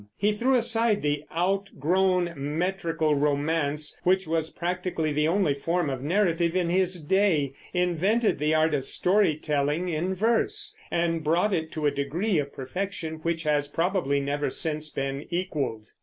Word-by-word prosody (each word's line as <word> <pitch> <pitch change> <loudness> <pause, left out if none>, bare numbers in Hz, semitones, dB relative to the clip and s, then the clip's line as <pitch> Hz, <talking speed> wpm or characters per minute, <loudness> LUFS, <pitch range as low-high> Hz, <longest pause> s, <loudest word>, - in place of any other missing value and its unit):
He 205 +1 +2
threw 255 +5 +2
aside 230 -3 +2
the 145 0 -1
outgrown 180 0 +1
metrical 165 +2 -1
romance, 150 +1 0
which 190 +1 +2
was 160 0 -1
practically 175 -3 -2
the 150 +1 +1
only 175 -3 +2
form 165 +2 -1
of 130 -1 -4
narrative 170 +1 +1
in 175 -2 +1
his 185 0 +1
day, 155 -4 +1 0.2
invented 180 +4 +1
the 150 +1 +2
art 155 0 +3
of 140 -3 0
story 180 +3 +3
telling 150 +3 -1
in 175 +4 -1
verse, 405 - 0
and 165 -1 0
brought 175 +7 +2
it 160 -2 -2
to 155 -2 -3
a 145 - +4
degree 165 +8 -1
of 140 -1 -3
perfection 160 +3 -5
which 165 0 -1
has 150 -2 +1
probably 165 -3 0
never 140 +1 -1
since 155 +2 -1
been 135 +1 -4
equaled. 145 -11 -3
165 Hz, 155 wpm, -26 LUFS, 150-185 Hz, 0.2 s, a